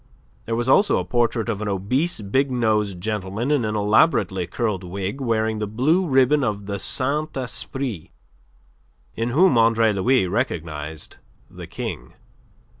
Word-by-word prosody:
There 115 - -2
was 120 +1 -2
also 200 +10 +4
a 90 - -2
portrait 115 +2 0
of 110 -3 -3
an 105 - -3
obese, 110 - -1
big 130 +8 0
nosed 105 -6 0
gentleman 105 +5 -3
in 145 -5 +2
an 110 0 -2
elaborately 105 - +2
curled 105 -4 -2
wig, 95 +8 -5
wearing 110 -3 0
the 105 - -2
blue 150 - +1
ribbon 135 +1 +3
of 105 -4 -2
the 100 0 -4
Saint 145 +6 0
Esprit, 125 - -3 1.0
in 115 +1 -2
whom 155 0 +4
Andre 115 -1 +3
Louis 120 +3 +2
recognized 80 - -4 0.3
the - - -10
King. 60 0 -6
110 Hz, 145 wpm, -22 LUFS, 100-130 Hz, 1.0 s, also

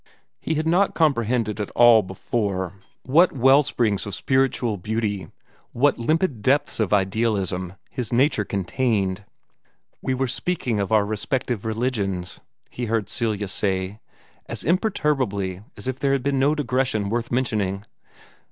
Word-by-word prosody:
He 160 - -2
had 155 +1 -1
not 180 +5 +2
comprehended 115 -8 +1
at 105 - -4
all 120 -2 +7
before 95 -1 -3 0.3
what 165 +7 +4
wellsprings 130 -6 +3
of 100 - -4
spiritual 130 -4 +1
beauty, 105 0 -2 0.5
what 140 +2 +2
limpid 155 - 0
depths 135 +4 +1
of 110 -4 0
idealism, 95 -3 0 0.2
his 120 -4 -4
nature 125 -3 +3
contained. 100 -1 -1 0.8
"We 130 - -1
were 135 +1 0
speaking 125 -4 -1
of 100 0 -2
our 105 -2 +4
respective 110 +1 -2
religions," 110 -6 -2 0.3
he 120 - -4
heard 110 -3 -1
Celia 110 -4 -1
say, 95 +1 -1 0.5
as - - -6
imperturbably 135 - 0 0.2
as - - -6
if 130 0 -3
there 140 0 +1
had 135 -2 0
been 140 -1 +1
no 145 +3 +3
digression 125 -7 0
worth 120 +1 -1
mentioning. 105 -6 -1
115 Hz, 135 wpm, -23 LUFS, 100-130 Hz, 0.8 s, all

